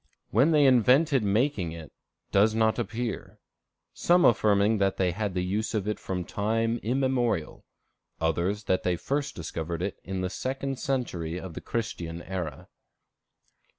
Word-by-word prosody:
When 130 - +4
they 150 -3 +5
invented 130 +3 +5
making 105 - 0
it, 80 -2 -9 0.4
does 105 +3 +4
not 110 +1 +2
appear, 115 0 -4 0.6
some 175 +1 +3
affirming 105 -1 +4
that 95 -1 +1
they 90 -2 +2
had 100 +1 -3
the 90 - 0
use 105 +5 -2
of 105 -2 -1
it 105 - -2
from 90 -2 -4
time 115 +4 0
immemorial; 125 - 0 0.6
others 85 +6 0
that 95 -2 +1
they 90 -1 +1
first 140 - -2
discovered 85 0 -4
it 100 - -4
in 95 0 -4
the 90 - -1
second 135 0 -3
century 90 - -2
of 95 -3 -8
the - - -7
Christian 85 -7 -4
era. 90 -4 -5
105 Hz, 150 wpm, -27 LUFS, 90-125 Hz, 0.6 s, they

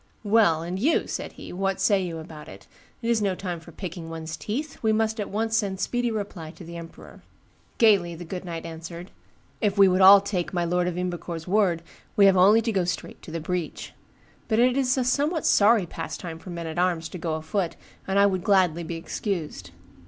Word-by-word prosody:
'Well, 205 -7 +3
and 180 +3 -4
you,' 300 +10 +2
said - - -5
he, - - -10
'what 195 +1 -1
say 200 -3 +3
you 170 -2 -4
about 155 -1 -10
it? - - -12 0.4
It 230 - -1
is 225 -2 +2
no 195 -2 +1
time 180 -2 -5
for 165 +1 -14
picking 170 -1 -7
one's 160 0 -6
teeth; 275 +8 -5
we 220 - +2
must 220 +1 0
at 205 - -3
once 225 +2 -1
send 195 -4 -1
speedy 245 +2 0
reply 200 -7 -5
to 175 - -12
the 170 +1 -9
emperor.' 165 -1 -11 0.6
Gayly 200 -7 +4
the 175 +1 -8
good 180 +2 -6
knight 170 -2 -6
answered, 170 +2 -8 0.5
'If 205 -2 +1
we 195 -1 +7
would 185 +1 +2
all 195 +1 +10
take 195 -3 -3
my 175 -1 +1
lord 180 +1 +1
of 180 -1 -3
Ymbercourt's 175 -2 -4
word, 180 -4 +2 0.3
we 200 - +6
have 195 -1 +6
only 205 +5 +6
to 230 - 0
go 190 -4 +1
straight 180 +1 -4
to - - -11
the 165 +1 -4
breach. 175 0 -4 0.5
But 220 - +1
it 245 +2 +4
is 265 -1 +1
a 260 - +2
somewhat 290 +6 0
sorry 210 -1 +5
pastime 165 0 -6
for 180 - -11
men 170 -1 -5
at 160 +1 -4
arms 175 -3 +1
to 180 - -8
go 160 -1 -2
afoot, 165 +3 -2 0.3
and 195 0 0
I 200 - +6
would 185 -3 0
gladly 180 -5 +3
be 165 +1 -5
excused. 165 - -4
185 Hz, 215 wpm, -25 LUFS, 170-210 Hz, 0.6 s, all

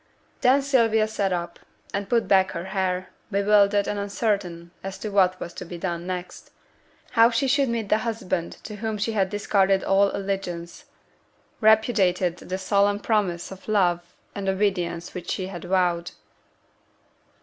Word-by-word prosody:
Then 265 +2 +4
Sylvia 225 -5 +3
sate 200 -3 -1
up, 170 -1 -3 0.3
and 200 0 -3
put 235 -2 +2
back 190 -1 +3
her 170 +1 -5
hair, 185 -1 -2 0.2
bewildered 200 0 +3
and 205 - -2
uncertain 200 -5 -2
as 195 0 -5
to 215 - -5
what 185 -2 +3
was 175 - -6
to - - -7
be 175 0 -8
done 170 0 -4
next; 180 -1 -6 0.6
how 230 -1 +6
she 240 +3 0
should 275 0 +2
meet 230 -3 -2
the 215 - +3
husband 220 -7 -3
to 210 - -7
whom 220 0 -3
she 210 +2 -1
had 195 -4 +1
discarded 195 -1 +2
all 195 +1 +3
allegiance, 190 -4 -4 0.7
repudiated 205 -6 +3
the 185 +1 -5
solemn 200 +1 +2
promise 195 -6 -1
of 190 0 -11
love 175 -5 +1 0.2
and 195 -1 -3
obedience 185 -4 -1
which 180 - -7
she 185 - -2
had 185 -2 -7
vowed. 175 -2 +1
195 Hz, 155 wpm, -24 LUFS, 180-215 Hz, 0.7 s, how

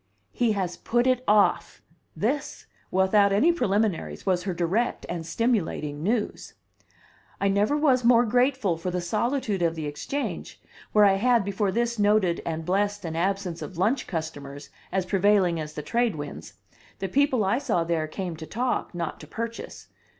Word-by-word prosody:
"He 235 -3 +1
has 185 -3 -2
put 240 +1 0
it 255 -1 +2
off!" 210 -1 +3 0.4
This, 275 +7 -2 0.2
without 195 +2 +3
any 220 +13 +4
preliminaries, 195 - -1
was 180 -2 +1
her 190 - -1
direct 190 +8 0
and 170 -2 -4
stimulating 165 -9 -1
news. 215 +5 -2 0.8
I 200 - +2
never 205 +9 +2
was 265 -5 +3
more 240 0 +5
grateful 245 -5 +1
for 165 +3 -4
the 180 0 -2
solitude 215 +3 -1
of 165 -1 +1
the 160 -2 -4
Exchange, 210 - -4 0.3
where 210 -1 +6
I 195 -1 +4
had, 235 0 +3
before 200 0 0
this, 235 +1 -1
noted 205 -4 +3
and 160 -1 -3
blessed 205 +2 0
an 160 -1 -4
absence 185 0 -1
of 185 - -7
lunch 225 +9 +1
customers 145 -4 -6 0.2
as 190 -1 0
prevailing 190 -3 +3
as 150 -1 -6
the 150 - -5
trade 235 +4 0
winds; 145 -1 -8 0.4
the 195 - -3
people 260 -1 +2
I 205 +7 +2
saw 225 -12 0
there 165 -2 -1
came 175 +1 -5
to 160 0 -8
talk, 245 -5 -2
not 170 -2 -4
to 150 - -11
purchase. 230 +7 -6
200 Hz, 165 wpm, -26 LUFS, 170-235 Hz, 0.8 s, where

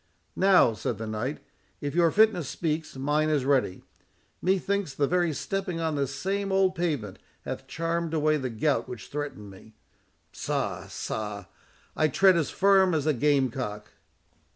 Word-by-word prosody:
"Now," 190 -11 +5
said 110 0 -3
the 110 - -5
knight, 110 +7 -3 0.4
"if 145 -1 -4
your 170 0 +4
fitness 210 -6 +3
speaks, 155 -2 -3
mine 150 +3 +1
is 145 -4 +1
ready. 130 -9 +1 0.6
Methinks 190 -4 0
the 145 - +2
very 175 +2 +1
stepping 185 +2 -3
on 160 -1 -1
this 140 -2 -2
same 195 +3 -2
old 190 -1 +3
pavement 150 - -2 0.3
hath - - -5
charmed 165 0 -2
away 155 0 +2
the 130 -3 -3
gout 120 +1 0
which 115 -5 -8
threatened 140 -9 -5
me. 105 +3 -16 0.6
Sa—sa—I 105 - -4
tread 190 +6 +5
as 165 -4 +1
firm 190 -2 +4
as 150 -2 0
a 155 - +3
game 135 -1 +2
cock." 105 -5 -5
150 Hz, 150 wpm, -27 LUFS, 130-175 Hz, 0.6 s, Now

